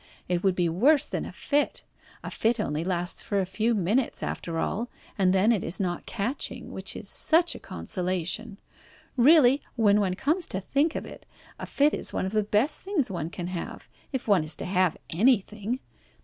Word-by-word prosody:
It 180 -1 -1
would 190 -2 +3
be 175 -1 +1
worse 270 - +4
than - - -3
a - - -7
fit. 290 0 0 0.4
A - - -6
fit 230 +1 +1
only 155 -6 -1
lasts 175 0 -1
for 200 - -1
a 190 - +1
few 220 +5 0
minutes 215 +6 0
after 165 -1 -4
all, 225 +8 -2 0.3
and 190 -2 +3
then 195 +4 +4
it 215 -6 +1
is 165 - -3
not 175 -3 -2
catching, 235 +6 -3
which - - -2
is - - -8
such 335 +2 +2
a - - -9
consolation. 180 - -2 0.6
Really, 275 0 +6
when 210 -4 +4
one 190 -3 0
comes 315 - 0
to 190 - -3
think 280 - 0
of - - -3
it, - - -12 0.3
a - - -6
fit 290 +2 +2
is - - -1
one - - -1
of 190 - -3
the 215 0 +2
best 210 +8 +2
things 360 - -1
one 165 -3 -3
can 175 0 -6
have, 175 -1 -6 0.2
if 265 -4 -4
one 195 -6 +4
is 155 0 -1
to - - -6
have 180 -2 +1
anything. 215 +3 +1
205 Hz, 195 wpm, -27 LUFS, 180-255 Hz, 0.6 s, Really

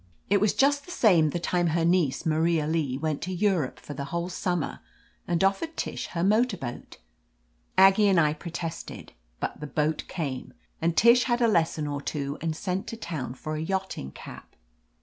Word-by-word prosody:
It 200 -1 +4
was 210 - +2
just 285 +1 +3
the 355 - -10
same 175 - +4
the 160 - -2
time 175 0 +1
her 165 +1 +1
niece, 170 -4 +2
Maria 160 0 +2
Lee, 150 -5 0
went 155 0 -2
to 185 - -4
Europe 185 -7 0
for 145 - -8
the 140 0 -5
whole 170 +4 -3
summer 175 -3 -2 0.5
and 175 +1 +1
offered 255 +13 0
Tish - - -3
her 170 -1 -3
motor 215 +2 +3
boat. 120 -6 -7 0.8
Aggie 195 +2 +6
and 190 -3 +4
I 150 -2 +3
protested, 165 +1 -6 0.3
but - - -4
the 150 - -6
boat 150 +2 -1
came, 140 -8 -5 0.3
and 165 0 0
Tish 235 +2 +6
had 240 -1 +1
a 235 - +4
lesson 165 -6 +1
or 145 -1 -3
two 140 -1 -4
and 160 -1 -1
sent 185 +3 -3
to 230 - -6
town 155 - -5
for 155 +4 -5
a 155 - -3
yachting 190 - -3
cap. - - -12
170 Hz, 190 wpm, -27 LUFS, 155-195 Hz, 0.8 s, Aggie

